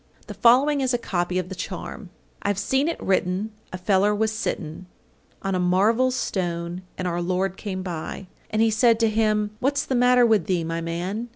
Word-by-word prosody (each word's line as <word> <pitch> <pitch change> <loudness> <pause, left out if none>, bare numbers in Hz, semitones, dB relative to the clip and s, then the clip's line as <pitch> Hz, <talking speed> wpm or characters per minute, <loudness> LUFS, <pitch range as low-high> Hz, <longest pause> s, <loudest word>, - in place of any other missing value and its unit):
The - - -7
following 275 +5 +4
is 255 -2 +1
a - - +2
copy 180 -5 -2
of 180 -1 -2
the - - -5
charm: 185 +1 -6 0.3
I've 200 -1 0
seen 265 +8 +1
it 335 - -2
written 190 +2 0 0.2
a 185 - -4
feller 195 +2 +2
was 220 +1 +1
sitten 180 -4 -4 0.6
On 195 0 -1
a 185 - 0
marvel 205 +8 +3
stone, 175 -7 -3 0.2
and 185 - -2
our 175 0 -1
Lord 185 +1 -1
came 190 -2 -5
by, 175 +1 -5 0.2
And 220 +1 +2
He 225 - +3
said 225 +1 +4
to 225 - +4
him, 215 -1 +1
"What's 280 +2 0
the - - -2
matter 250 0 +5
with 215 -7 +2
thee, 180 -3 +1
my 165 +1 -3
man?" 180 +8 -3
195 Hz, 195 wpm, -24 LUFS, 180-225 Hz, 0.6 s, matter